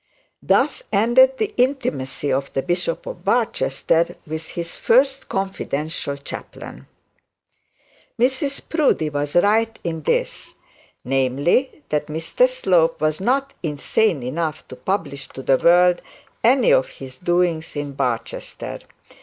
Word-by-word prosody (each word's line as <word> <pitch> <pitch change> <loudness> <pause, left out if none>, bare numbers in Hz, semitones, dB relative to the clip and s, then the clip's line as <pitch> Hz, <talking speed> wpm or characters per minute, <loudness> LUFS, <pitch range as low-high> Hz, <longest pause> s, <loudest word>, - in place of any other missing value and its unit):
Thus - - +2
ended 250 +6 +5
the 425 +5 -2
intimacy 145 - 0
of 135 +1 -2
the 135 - -1
Bishop 175 -1 -2
of 175 - -8
Barchester 170 - +1
with 160 +1 -5
his 170 -1 -5 0.5
confidential 155 -6 -3
chaplain. 140 - -9 1.3
Mrs 265 +3 0
Proudie 280 - +1
was 145 +1 -3
right 220 +5 +3
in 165 -2 -3
this; - - -1 0.5
namely, 135 - +1
that 150 -1 -1
Mr 165 - +1
Slope 175 - +2
was 155 +2 0
not 270 +5 0
insane 160 - 0
enough 155 +4 -3
to - - -8
publish 140 0 -3
to 135 - -10
the 135 - +4
world 175 +2 +4 0.4
any 260 - +5
of - - +3
his 130 - -11
doings 175 -2 0
in 145 -1 -3
Barchester. 125 -4 -3
170 Hz, 120 wpm, -21 LUFS, 145-225 Hz, 1.3 s, ended